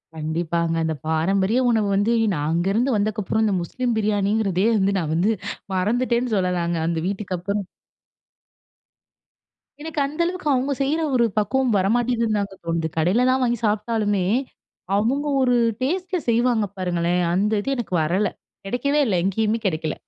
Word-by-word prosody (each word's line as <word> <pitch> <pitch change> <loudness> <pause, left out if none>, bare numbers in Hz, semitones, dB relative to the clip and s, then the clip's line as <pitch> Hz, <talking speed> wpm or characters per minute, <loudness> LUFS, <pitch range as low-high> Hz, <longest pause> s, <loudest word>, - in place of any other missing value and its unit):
கண்டிப்பாங்க 165 +1 -1
அந்த 160 - 0
பாரம்பரிய 190 +8 +1
உணவு 220 -3 +2
வந்து 205 +4 +2 0.2
நான் 150 -1 -2
அங்கேருந்து 205 +9 +1
வந்ததுக்கப்புறம், 215 +1 0
இந்த 205 - +1
முஸ்லீம் 240 +7 -2
பிரியாணிங்கிறதே, 205 -2 +1
வந்து 195 0 +1
நான் 155 -2 -2
வந்து 190 +7 +2 0.4
மறந்துட்டேன்னு 235 +4 0
சொல்லலாங்க, 175 -2 0
அந்த 165 -1 -1
வீட்டுக்கப்புறம் 200 0 -3 2.2
எனக்கு 320 -1 -4
அந்த 300 +4 -7
அளவுக்கு, 365 -2 -4
அவங்க 265 +2 0
செய்ற 295 +4 +1 0.2
ஒரு 240 -1 +4
பக்குவம் 250 +4 +1
வர 190 - +1
மாட்டேங்குதுன்னு 235 -3 +1
தாங்க 200 -1 -4
தோணுது. 165 -1 -1
கடையிலலாம் 245 +11 +2
வாங்கி 240 -1 +1
சாப்பிட்டாலுமே, 210 -2 0 0.7
அவங்க 260 +8 +1
ஒரு 250 -1 +3 0.3
டேஸ்ட்டுல 365 +6 -1
செய்வாங்க 235 -1 +2
பாருங்களேன். 180 -1 0
அந்த 205 +4 +1
இது 270 - -4
எனக்கு 230 -8 -5
வரல 185 +7 +1 0.4
கிடைக்கவே 280 +8 0
இல்ல, 210 -6 +1
எங்கயுமே 215 +3 +1
கிடைக்கல. 160 -4 -1
210 Hz, 135 wpm, -22 LUFS, 180-245 Hz, 2.2 s, ஒரு